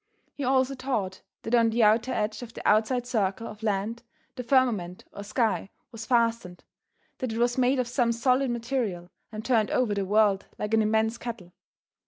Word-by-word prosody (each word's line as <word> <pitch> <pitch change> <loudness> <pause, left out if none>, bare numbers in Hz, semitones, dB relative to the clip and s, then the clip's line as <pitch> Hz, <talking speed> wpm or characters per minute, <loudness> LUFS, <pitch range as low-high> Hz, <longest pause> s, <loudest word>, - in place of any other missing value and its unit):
He 285 - -6
also 260 +1 +2
taught 230 -8 -3 0.2
that 225 - -4
on 230 -1 +5
the 225 +1 +2
outer 220 +4 +3
edge 215 +1 -2
of 235 -2 -10
the - - -4
outside 230 +4 +2
circle 220 -3 -1
of 210 -1 -9
land 215 +2 -2 0.3
the 255 - -4
firmament 235 -9 +1
or 200 - -7
sky 220 -1 -1 0.2
was 225 -2 -8
fastened, 230 -7 0 0.6
that 255 -3 -2
it - - -4
was 240 +1 +2
made 255 +1 +2
of 250 -2 0
some 240 -1 +1
solid 255 +3 +1
material 230 -7 -3 0.2
and 215 0 -7
turned 230 -4 +2
over 245 -5 +1
the 200 -1 -1
world 205 -1 +2
like 210 +1 -4
an 220 - +5
immense 220 +1 +1
kettle. 225 -8 -7
230 Hz, 185 wpm, -27 LUFS, 210-245 Hz, 0.6 s, on